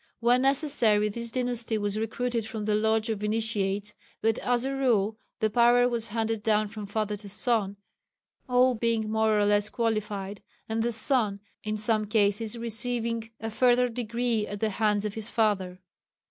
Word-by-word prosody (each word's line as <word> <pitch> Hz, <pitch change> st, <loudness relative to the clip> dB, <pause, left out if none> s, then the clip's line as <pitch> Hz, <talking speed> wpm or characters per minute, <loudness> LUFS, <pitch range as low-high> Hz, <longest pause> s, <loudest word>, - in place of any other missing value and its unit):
When 240 Hz, +2 st, +3 dB
necessary, 255 Hz, -7 st, +2 dB
this 235 Hz, +2 st, -3 dB
dynasty 240 Hz, -2 st, -1 dB
was 205 Hz, 0 st, -2 dB
recruited 230 Hz, 0 st, -2 dB
from 220 Hz, -1 st, -5 dB
the 210 Hz, -, +1 dB
Lodge 220 Hz, +1 st, +1 dB
of 210 Hz, -1 st, -4 dB
Initiates, 210 Hz, -2 st, -1 dB, 0.3 s
but 225 Hz, 0 st, +1 dB
as 245 Hz, 0 st, 0 dB
a 270 Hz, -, -2 dB
rule 225 Hz, -6 st, +1 dB, 0.2 s
the 220 Hz, -, +2 dB
power 240 Hz, +2 st, +5 dB
was 235 Hz, -2 st, -1 dB
handed 225 Hz, 0 st, -2 dB
down 215 Hz, -1 st, +1 dB
from 210 Hz, -1 st, -7 dB
father 210 Hz, 0 st, -2 dB
to 205 Hz, 0 st, -10 dB
son, 210 Hz, -2 st, 0 dB, 0.7 s
all 250 Hz, +1 st, +4 dB
being 225 Hz, -2 st, -1 dB
more 220 Hz, -1 st, +2 dB
or 205 Hz, -, +3 dB
less 205 Hz, 0 st, +2 dB
qualified, 210 Hz, -3 st, -2 dB, 0.3 s
and 225 Hz, 0 st, -1 dB
the 240 Hz, +1 st, 0 dB
son 220 Hz, -3 st, +2 dB, 0.2 s
in 215 Hz, 0 st, -2 dB
some 215 Hz, 0 st, +1 dB
cases 210 Hz, +1 st, +1 dB
receiving 230 Hz, 0 st, -2 dB
a 225 Hz, 0 st, -4 dB
further 250 Hz, +1 st, +3 dB
degree 235 Hz, -1 st, -1 dB
at 205 Hz, -, -6 dB
the 220 Hz, 0 st, 0 dB
hands 210 Hz, 0 st, +1 dB
of 210 Hz, -, -3 dB
his 220 Hz, +1 st, -4 dB
father. 195 Hz, -5 st, 0 dB
220 Hz, 170 wpm, -27 LUFS, 210-235 Hz, 0.7 s, power